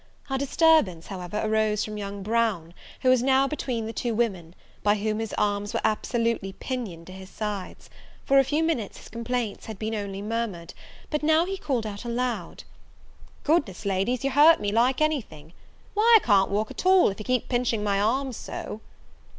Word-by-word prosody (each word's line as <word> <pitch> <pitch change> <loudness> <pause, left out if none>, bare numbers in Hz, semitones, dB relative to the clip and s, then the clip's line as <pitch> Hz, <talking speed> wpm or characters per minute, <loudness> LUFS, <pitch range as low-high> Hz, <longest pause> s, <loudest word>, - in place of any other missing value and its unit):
Our 270 - 0
disturbance, 280 - +3
however, 185 +1 -5
arose 215 -1 +1
from 215 - -6
young 200 -1 -5
Brown, 210 -6 0 0.3
who 255 - +3
was 255 -2 +5
now 265 +1 +3
between 255 -6 -3
the 225 - -5
two 235 -1 -2
women, 185 -7 -2 0.3
by 205 0 +3
whom 215 +1 -2
his 225 -1 -3
arms 205 0 0
were - - 0
absolutely 225 -2 0
pinioned 210 -12 -5
to 185 - -11
his 190 0 -10
sides: 210 -3 -5 0.4
for 275 0 +5
a - - +5
few 295 +4 0
minutes 285 -11 -1
his - - -13
complaints 235 -1 -3
had 220 -3 -7
been 220 +2 -3
only 200 -2 -4
murmured: 210 -6 -3 0.4
but 300 - 0
he 300 - -1
now 320 +2 +4 0.2
called 250 -6 -1
out 205 -1 -6
aloud, 235 -6 -3 0.8
"Goodness, 285 - 0
Ladies, 200 +6 0
you 275 - 0
hurt 300 +5 +6
me 205 -1 -1
like 245 +6 +2
any 310 -2 +2
thing! 155 -4 -15 0.4
why, 445 +3 +4
I - - -14
can't 200 -4 +4
walk 210 +2 -1
at - - -6
all, 375 0 +5
if 195 - -7
you - - -5
keep 255 -2 0
pinching 240 -4 0
my 200 -1 +1
arms 255 +3 0
so!" 215 - -7
220 Hz, 190 wpm, -26 LUFS, 200-255 Hz, 0.8 s, hurt